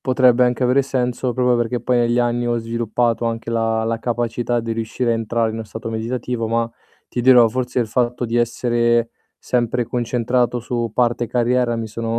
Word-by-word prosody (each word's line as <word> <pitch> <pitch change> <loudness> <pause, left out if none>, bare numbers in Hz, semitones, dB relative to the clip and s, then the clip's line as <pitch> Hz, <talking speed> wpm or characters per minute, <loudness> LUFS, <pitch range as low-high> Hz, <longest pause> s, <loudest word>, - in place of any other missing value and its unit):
potrebbe 125 -1 +4
anche 125 +1 0
avere 130 +2 +3
senso 125 -1 -1
proprio 125 -1 +2
perché 120 0 -1
poi 125 +1 +1
negli 120 0 +2
anni 120 0 0
ho 120 0 +1
sviluppato 115 +1 -1
anche 115 0 -3
la 115 -1 0
la 115 0 -1
capacità 120 0 -1
di 115 0 -3
riuscire 115 +2 -2
a - - +1
entrare 115 0 -1
in 110 - -5
'no 115 - -5
stato 110 +2 -7
meditativo, 115 +1 -3
ma 115 +1 0 0.4
ti 120 - -3
dirò, 125 -2 +7
forse 125 +1 -2
il 115 - -1
fatto 125 +1 0
di 115 +1 -2
essere 120 0 +1 0.3
sempre 120 0 0
concentrato 120 +1 0
su 120 -2 -3
parte 120 -1 +1
carriera 120 0 +1
mi 115 -1 -4
sono 115 +1 -3
120 Hz, 185 wpm, -20 LUFS, 115-125 Hz, 0.4 s, dirò